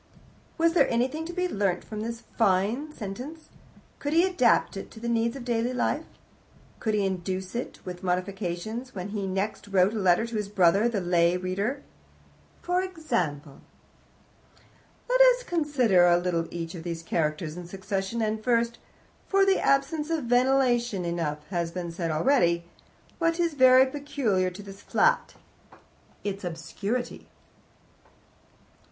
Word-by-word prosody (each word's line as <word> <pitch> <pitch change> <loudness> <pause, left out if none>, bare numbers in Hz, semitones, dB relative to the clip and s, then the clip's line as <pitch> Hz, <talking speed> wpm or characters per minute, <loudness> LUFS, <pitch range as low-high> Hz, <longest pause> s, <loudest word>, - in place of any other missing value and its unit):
Was 330 0 +3
there 345 - +4
anything 260 +7 0
to - - -5
be 360 0 0
learnt 195 - -1
from 215 -1 -6
this 230 +1 -5
fine 225 +8 +1
sentence? 255 +8 -8 0.5
Could 290 +1 -2
he 335 +3 +5
adapt 340 - +2
it 195 - -7
to 220 - -12
the 235 - -5
needs 235 +1 +1
of 260 -3 -7
daily 240 +1 0
life? 295 +5 0 0.7
Could 220 -2 0
he 205 -2 +1
introduce 185 0 -3
it, 240 +1 -5
with 180 -1 -7
modifications, 190 +6 -3
when 185 +1 -5
he 200 -2 -3
next 195 +2 -3
wrote 195 +1 +3
a 220 - -2
letter 185 +2 +3
to 235 0 -6
his 210 -1 -3
brother, 200 +3 +4
the 215 -4 -1
lay 175 0 +3
reader? 200 +9 -2 0.8
For 360 +1 +1
example 185 - -3 1.5
"Let - - +3
us - - +6
consider 260 - +3
a 175 0 +5
little 175 -2 -1
each 165 -1 -5
of 170 - -7
these 165 -1 -5
characters 155 -1 -1
in 175 -1 -8
succession, 195 +4 -3
and 215 0 -2
first 235 -1 +1 0.5
(for 390 0 +3
of 390 - +4
the 385 - +3
absence 295 +3 +1
of 325 -3 -1
ventilation 245 -5 +2
enough 155 -3 -3
has 170 -2 -1
been 175 0 -5
said 165 0 -3
already), 170 - +2 0.6
what 330 0 +1
is 340 -2 +1
very 260 -1 +7
peculiar 260 -9 -1
to 185 +3 -10
this 195 0 -11
flat 485 0 +1 0.9
its 200 -1 -4
obscurity. 180 +8 -4
215 Hz, 150 wpm, -27 LUFS, 180-265 Hz, 1.5 s, very